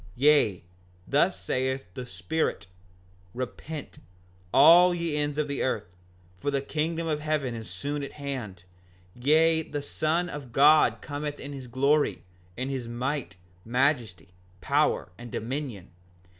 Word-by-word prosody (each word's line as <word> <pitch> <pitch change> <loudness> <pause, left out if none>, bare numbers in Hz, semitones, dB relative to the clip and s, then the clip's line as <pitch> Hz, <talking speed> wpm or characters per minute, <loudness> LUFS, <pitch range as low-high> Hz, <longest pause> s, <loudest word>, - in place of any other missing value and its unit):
5:50 80 - -20
Yea, 135 -8 +4 0.4
thus 170 +6 +2
saith 130 +1 -1
the 125 +3 -7
Spirit: 95 - -2 0.7
Repent, 140 +4 -6 0.5
all 170 +6 +7
ye 170 -3 -2
ends 145 0 -1
of 150 -1 0
the 140 -1 -3
earth, 90 -8 -2 0.4
for 145 - -1
the 140 -1 +1
kingdom 160 +4 -2
of 155 -2 -1
heaven 150 -5 -1
is 115 -1 -7
soon 145 +1 -3
at 140 - -6
hand; 125 -11 -6 0.5
yea, 160 +5 +3
the 145 -2 -5
Son 160 +4 0
of 145 -7 -7
God 150 +4 +5
cometh 145 0 -4
in 140 +1 -7
his 135 -2 -8
glory, 140 +5 +1 0.3
in 130 +2 -2
his 130 -4 -3
might, 125 - -3 0.3
majesty, 120 - 0 0.3
power, 90 - +1
and 120 -1 -9
dominion. 120 -5 -5
140 Hz, 140 wpm, -27 LUFS, 125-150 Hz, 0.7 s, all